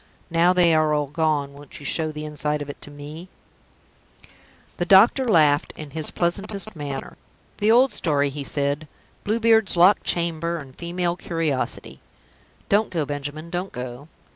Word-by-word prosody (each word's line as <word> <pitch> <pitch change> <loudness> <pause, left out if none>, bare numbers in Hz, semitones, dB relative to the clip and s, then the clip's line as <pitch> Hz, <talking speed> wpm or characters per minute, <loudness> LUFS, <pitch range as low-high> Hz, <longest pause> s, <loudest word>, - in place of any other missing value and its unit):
Now 170 +2 +4
they 175 -2 +4
are 155 -1 +3
all 150 -1 0
gone, 145 -1 -1
won't 140 -1 -12
you 145 - -11
show 155 0 -1
the 150 0 -7
inside 150 0 -2
of 145 - -6
it - - -17
to - - -7
me?" 150 +5 -10 1.5
The 175 - -1
doctor 220 +8 +5
laughed 150 -8 +3
in 150 -2 -9
his 155 0 0
pleasantest 200 +4 -1
manner. 140 -3 -6 0.4
"The 210 - +2
old 245 +1 +5
story," 145 -6 0
he 140 +1 -6
said. 145 +2 -2 0.4
"Blue 220 +3 0
Beard's 220 -4 +3
locked 185 +4 +5
chamber, 170 0 -1
and 135 -4 -10
female 175 0 -2
curiosity! 165 -6 -3 0.7
(Don't 210 +2 +2
go, 165 -5 -1
Benjamin, 145 +3 -6
don't 180 +2 -3
go.) 125 +3 -7
160 Hz, 160 wpm, -23 LUFS, 145-180 Hz, 1.5 s, doctor